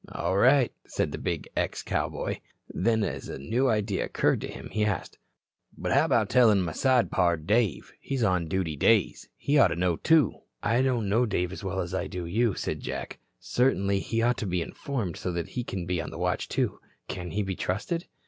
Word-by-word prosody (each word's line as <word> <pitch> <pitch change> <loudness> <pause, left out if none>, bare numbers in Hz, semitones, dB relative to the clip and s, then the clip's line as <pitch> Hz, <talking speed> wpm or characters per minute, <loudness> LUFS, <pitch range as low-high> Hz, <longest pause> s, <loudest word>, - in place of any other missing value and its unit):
"All 95 - -1
right," 130 +5 +4
said - - -1
the - - -5
big - - -3
ex - - -1
cowboy. - - -2 0.3
Then 110 +2 +2
as - - -4
a - - -5
new 120 - +1
idea 105 -3 0
occurred - - +1
to - - -4
him, - - -9
he 105 - 0
asked: 105 -5 -2 0.6
"But - - -3
how - - +4
about 110 -3 +2
tellin' 110 -5 +5
my 85 - -2
side 130 - +2
pard, 85 -3 +1
Dave? 105 0 +1
He's 135 -3 -2
on 90 -5 +2
duty 80 -2 -1
days. 105 +6 +2
He 145 +1 +2
oughta 90 - +5
know, 90 -1 +1
too." 160 -3 +4 0.3
"I 120 +2 +2
don't 125 -5 +1
know 115 +5 +2
Dave 90 -4 -1
as 95 - -8
well 95 0 -2
as 85 0 -5
I 95 - -1
do 90 -2 -5
you," 110 +4 +1
said - - -3
Jack. - - -5 0.2
"Certainly 100 -6 +1
he 115 +3 -1
ought 120 +1 +2
to 105 - -3
be 90 -2 0
informed, 110 - -4
so 90 - -3
that 85 -1 -3
he 125 - -3
can 95 -6 -4
be 90 -1 -1
on - - -6
the 80 - -8
watch, 90 +1 -1
too. - - -1 0.3
Can 90 -1 -5
he 105 +6 -1
be 95 -1 -3
trusted?" 165 - -2
100 Hz, 210 wpm, -27 LUFS, 90-120 Hz, 0.6 s, tellin